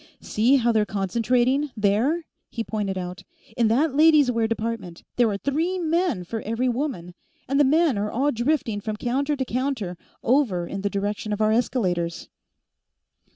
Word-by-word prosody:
"See 235 +6 +2
how 240 -3 +3
they're 220 -2 +3
concentrating, 240 +8 +1
there?" 225 +12 +1 0.2
he 230 - -4
pointed 205 -4 -3
out. 180 +1 -5 0.3
"In 235 -2 +3
that 265 +7 +2
ladies' 305 -3 +5
wear 230 -2 +1
department, 220 -6 -4
there 240 -2 +3
are 200 - -2
three 315 - -1
men 335 - 0
for 220 +5 -5
every 230 +4 -1
woman, 240 - -3 0.3
and 275 +2 +1
the - - +6
men 295 -4 +3
are 210 +1 -1
all 275 +5 +1
drifting 240 -4 -1
from 215 +1 -3
counter 275 +6 -1
to 265 -2 -2
counter 240 -9 -3 0.2
over 230 -9 +2
in 195 +3 -5
the 200 - 0
direction 205 +1 -3
of 205 - -3
our 215 0 +3
escalators." 185 -8 -1
230 Hz, 165 wpm, -24 LUFS, 205-275 Hz, 0.3 s, the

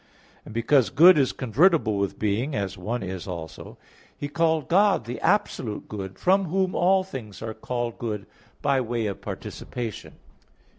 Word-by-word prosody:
And - - -10
because 120 +2 +3
good 170 +7 +8
is 135 - +2
convertible 130 - +2
with 100 -1 -2
being, 110 +8 -1
as 100 -1 -2
one 110 +4 -3
is 95 -1 -5
also; 85 -3 -7 0.4
he 145 - -4
called 160 -1 +1
God 195 - +3
the 120 - -5
absolute 125 - 0
good, 95 -2 -6
from 190 +2 +3
whom 185 +2 0
all 190 +2 +3
things 125 - -8
are 110 -1 -4
called 120 +1 -4
good 105 -4 -4 0.4
by 140 -2 +2
way 120 -2 -2
of 100 -2 -4
participation. 120 -4 -6
120 Hz, 155 wpm, -25 LUFS, 105-160 Hz, 0.4 s, good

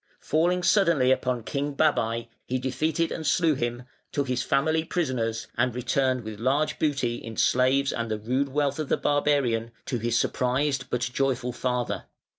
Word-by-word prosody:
Falling 175 +4 +1
suddenly 170 -11 +4
upon 125 -2 0
King 140 +4 -3
Babai, 115 -7 +1 0.2
he 130 - 0
defeated 155 +6 -1
and 160 - -4
slew 165 0 +3
him, 120 -2 -3 0.3
took 140 -2 -1
his 125 -1 0
family 160 +3 +1
prisoners, 130 -10 -1
and 120 0 +1
returned 130 0 0
with 110 -1 -7
large 135 +6 +1
booty 135 -6 0
in 115 -1 -8
slaves 135 +2 +3
and 115 -1 -3
the 110 - -1
rude 130 +6 -1
wealth 145 +2 0
of 155 - -3
the - - +2
barbarian 140 -6 +1 0.2
to 120 - -2
his 120 +1 0
surprised 130 +3 0
but 125 - -1
joyful 125 0 0
father. 125 0 -2
130 Hz, 165 wpm, -26 LUFS, 120-145 Hz, 0.3 s, suddenly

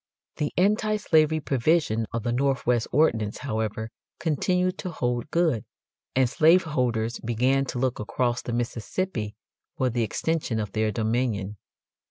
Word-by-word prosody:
The 150 - -1
anti 210 +3 +3
slavery 160 -5 +3
provision 135 -5 +1
of 115 -2 -3
the 120 - 0
Northwest 125 -2 +1
Ordinance, 115 -9 +2
however, 110 -3 -3 0.3
continued 180 +3 0
to 185 - -4
hold 125 -4 -2
good, 160 -10 +1 0.5
and 130 -1 +4
slave 165 +7 +5
holders 120 -6 -1
began 125 +4 +1
to 130 - -5
look 130 0 0
across 120 +2 -1
the - - -5
Mississippi 120 - -3 0.4
for 130 -1 +1
the 120 +1 0
extension 130 0 -1
of 105 -2 -3
their 110 0 0
dominion. 110 -3 -1
125 Hz, 140 wpm, -26 LUFS, 115-155 Hz, 0.5 s, slave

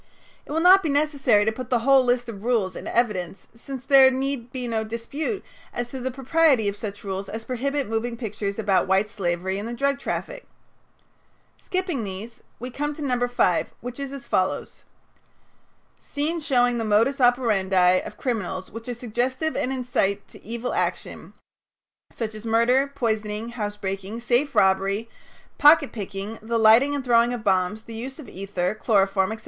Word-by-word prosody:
It - - -9
will 320 +2 0
not 370 +3 +7
be 325 - -2
necessary 280 -7 +2
to 220 - +2
put 250 +2 -7
the 245 -2 +2
whole 270 -1 +6
list 245 0 +1
of 210 -3 -8
rules 220 -7 0
in - - -7
evidence 195 -6 -1
since 260 +2 -8
there 270 -1 +7
need 260 -2 -3
be 250 -2 -4
no 225 -2 -1
dispute 255 - -4 0.3
as 240 0 -4
to 265 - -5
the 260 +1 -2
propriety 270 -2 +2
of 200 - -1
such 205 -1 -7
rules 195 0 -4
as 225 +1 -6
prohibit 275 +3 -2
moving 230 +2 -2
pictures 210 -3 -4
about 200 -4 +2
white 190 +2 +2
slavery 190 -1 -2
and 210 - -5
the 240 - -5
drug 280 +2 0
traffic. - - -5 1.1
Skipping 365 - -2
these, 210 +5 -7 0.2
we 250 +2 -6
come 295 +3 -3
to 300 - -6
No. 250 -3 +1
5, 215 -8 +1
which 245 +2 -7
is 275 -1 -4
as 275 -3 -8
follows: 185 -5 -2 1.2
"Scenes 310 +3 -3
showing 245 -3 +2
the - - -1
modus 225 +6 +2
operandi 195 -7 +3
of 210 - -9
criminals 190 -7 -3
which 230 +2 -9
are 245 - -3
suggestive 250 +6 -2
and 255 - -1
incite 235 -6 -1
to - - -15
evil 235 +3 -4
action, - - -3 0.8
such 220 -2 -4
as 215 0 -9
murder, 235 +4 +3
poisoning, 220 -2 -2
housebreaking, 205 -2 -4
safe 240 +4 +1
robbery, 195 +3 +2 0.5
pocket 295 -1 +6
picking, 205 +1 -6
the 230 +1 -1
lighting 230 +6 +5
and 275 -2 -4
throwing 235 -1 +4
of 240 -3 -5
bombs, 195 +1 +1
the 230 - -10
use 255 +4 -6
of 305 - -10
ether, 190 -1 -3
chloroform, 195 -3 +2
etc. 220 - -5
235 Hz, 175 wpm, -24 LUFS, 205-265 Hz, 1.2 s, not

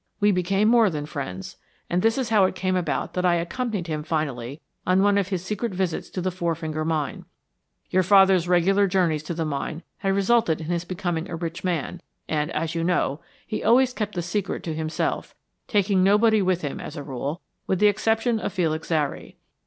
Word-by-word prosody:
We 205 0 +4
became 195 +3 +1
more 230 -2 +5
than 150 -4 -4
friends, 115 -11 -6 0.3
and 175 +1 0
this 225 +3 +2
is 260 -4 -1
how 210 -4 +5
it 185 - -1
came 185 0 0
about 180 -2 -1
that 180 - -1
I 175 -1 +4
accompanied 195 +3 -2
him 155 -3 -3
finally 145 -4 -3 0.2
on 185 +1 +3
one 205 0 +4
of 200 -2 +1
his 185 -2 -3
secret 210 +1 -3
visits 180 -3 -2
to 185 - -4
the 185 +1 -1
Four 170 -2 -1
Finger 155 -1 -3
Mine. 155 -2 -2 0.7
Your 185 - +4
father's 190 -1 +5
regular 190 +3 +3
journeys 180 -5 +1
to 160 +2 -5
the 165 0 -1
mine 155 +2 -4
had 195 -1 0
resulted 200 -4 +2
in 155 - -6
his 175 0 -1
becoming 175 -2 -3
a 170 - -4
rich 165 0 -5
man, 175 -1 -2 0.3
and, 150 0 -1
as 160 +1 -2
you 165 0 -1
know, 165 -4 0 0.2
he 215 - -4
always 250 +3 +4
kept 210 -4 -3
the 175 - -2
secret 190 +3 -2
to 165 - -3
himself, 155 0 -2 0.3
taking 200 -2 +2
nobody 210 +2 +4
with 185 -2 0
him 145 - -3
as 150 - -7
a 145 - -5
rule, 140 +4 -4 0.3
with 190 - +1
the 210 - +3
exception 225 +3 +2
of 205 - -4
Felix 160 -5 -1
Zary. 150 -4 -2
180 Hz, 205 wpm, -24 LUFS, 160-200 Hz, 0.7 s, more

